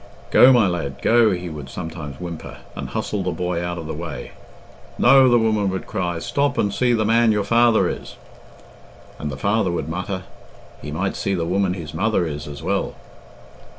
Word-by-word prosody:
"Go, 130 - +8
my 120 -6 +5
lad, 80 -7 -3
go," 115 -1 +5
he 90 -2 -2
would 75 -4 -7
sometimes 80 -5 -7
whimper, 85 -2 -7 0.2
and - - -5
hustle 105 - -2
the 90 - -1
boy 90 0 -2
out 85 0 -3
of 80 - -6
the 80 - -4
way. - - -6 0.7
"No," 135 +1 +6
the 120 - +5
woman 110 -3 +1
would 95 0 -4
cry, 90 -4 -2
"stop 140 +10 -1
and 100 -1 +1
see 125 +4 +2
the 110 -2 +1
man 115 +1 +4
your 105 -1 +1
father 115 +2 +4
is." - - -6 1.0
And 75 - -4
the 65 - -6
father 100 +5 +1
would 85 - -3
mutter, 90 +2 -4 0.6
"He 75 - -7
might 90 +6 -2
see 100 - -1
the 85 -2 -1
woman 90 +1 0
his 80 -4 -7
mother 95 +1 +1
is 75 -2 -5
as 70 -1 -8
well." - - -1
95 Hz, 190 wpm, -22 LUFS, 85-110 Hz, 1.0 s, Go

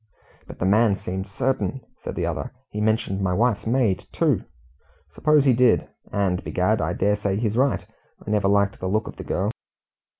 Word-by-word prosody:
"But - - -10
the - - -1
man 105 +1 +4
seemed 95 +1 -4
certain," 130 +6 -1 0.2
said - - -5
the - - -1
other. - - -3 0.2
"He 105 - -3
mentioned 105 -3 0
my 90 -2 +1
wife's 110 0 +1
maid, 115 -6 +1
too!" - - +2 0.7
"Suppose 150 -2 +3
he 130 - +5
did? 125 0 +3 0.2
and, 95 -3 0
begad, 105 +4 +1
I 80 +2 0
dare 105 +3 +2
say 100 -1 -1
he's 110 -1 -1
right 135 +2 +1 0.4
I 105 - -4
never 105 -2 +2
liked 100 +1 +2
the 95 - -3
look 110 +3 0
of - - -9
the - - -6
girl. 100 +4 -1
105 Hz, 190 wpm, -24 LUFS, 95-115 Hz, 0.7 s, he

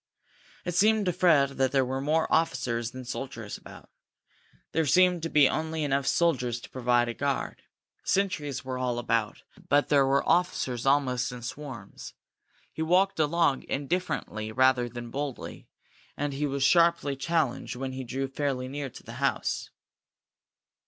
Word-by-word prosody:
It 175 - -2
seemed 215 +3 +3
to 180 - +1
Fred 155 -6 +3
that 130 -1 +2
there 135 -1 +3
were 130 +1 -3
more 155 +3 +2
officers 125 -7 0
than 130 +1 -9
soldiers 120 -4 -6
about. - - -12 0.8
There 160 -2 +1
seemed 180 +3 +4
to 165 - -3
be 145 -3 +6
only 160 +1 -2
enough 140 -1 0
soldiers 125 -9 +1
to - - -12
provide 120 -1 +2
a 120 - -2
guard. 140 +3 -2 0.4
Sentries 150 -10 -1
were 130 -1 -3
all 125 -2 -1
about, 115 -2 -1 0.3
but 145 +1 +3
there 140 -2 +4
were 140 +1 +2
officers 135 -8 +1
almost 130 -3 +2
in 125 -1 -8
swarms. 120 -5 -8 0.6
He - - -5
walked 180 +3 +2
along, 155 -2 +2
indifferently 140 -8 -2
rather 130 0 +3
than 120 0 -8
boldly, 140 -1 -5 0.5
and 145 0 -2
he 145 +2 -1
was 140 -1 -1
sharply 170 -3 +4
challenged 140 -3 -1
when 130 +1 -4
he 130 0 -5
drew 135 +2 -3
fairly 135 -2 -2
near 140 +1 -4
to - - -13
the - - -9
house. - - -1
135 Hz, 155 wpm, -28 LUFS, 125-160 Hz, 0.8 s, be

